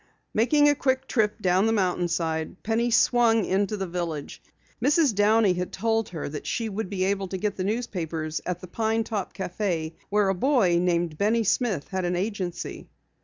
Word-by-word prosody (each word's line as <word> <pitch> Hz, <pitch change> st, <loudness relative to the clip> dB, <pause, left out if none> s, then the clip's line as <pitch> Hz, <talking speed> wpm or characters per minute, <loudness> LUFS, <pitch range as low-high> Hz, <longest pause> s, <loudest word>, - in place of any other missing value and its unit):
Making 290 Hz, +7 st, +4 dB
a 290 Hz, -, +6 dB
quick 265 Hz, -2 st, 0 dB
trip 215 Hz, -3 st, +1 dB
down 185 Hz, +3 st, +3 dB
the -, -, +2 dB
mountainside, 175 Hz, -4 st, -1 dB
Penny 230 Hz, +2 st, +1 dB
swung 230 Hz, -2 st, +4 dB
into 200 Hz, +2 st, 0 dB
the 195 Hz, -, -2 dB
village. 170 Hz, -4 st, -5 dB, 0.4 s
Mrs. 290 Hz, -1 st, +4 dB
Downey 205 Hz, -1 st, +4 dB
had 180 Hz, 0 st, -3 dB
told 225 Hz, +1 st, 0 dB
her 165 Hz, -4 st, -5 dB
that 145 Hz, +1 st, -6 dB
she 230 Hz, -2 st, -1 dB
would 210 Hz, -1 st, -4 dB
be 190 Hz, -2 st, -1 dB
able 195 Hz, 0 st, 0 dB
to 190 Hz, -, -4 dB
get 205 Hz, +1 st, -2 dB
the 185 Hz, -, -3 dB
newspapers 170 Hz, -8 st, -3 dB
at 180 Hz, -1 st, -3 dB
the 185 Hz, -, -9 dB
Pine 225 Hz, +4 st, 0 dB
Top 210 Hz, -4 st, -3 dB
Cafe 175 Hz, -3 st, -3 dB, 0.2 s
where 205 Hz, -1 st, +2 dB
a -, -, +2 dB
boy 195 Hz, -5 st, +3 dB
named 170 Hz, -3 st, 0 dB
Benny 225 Hz, +3 st, +2 dB
Smith 210 Hz, -, 0 dB
had 190 Hz, -1 st, -2 dB
an 175 Hz, 0 st, 0 dB
agency. 185 Hz, -2 st, -4 dB
195 Hz, 180 wpm, -26 LUFS, 180-225 Hz, 0.4 s, a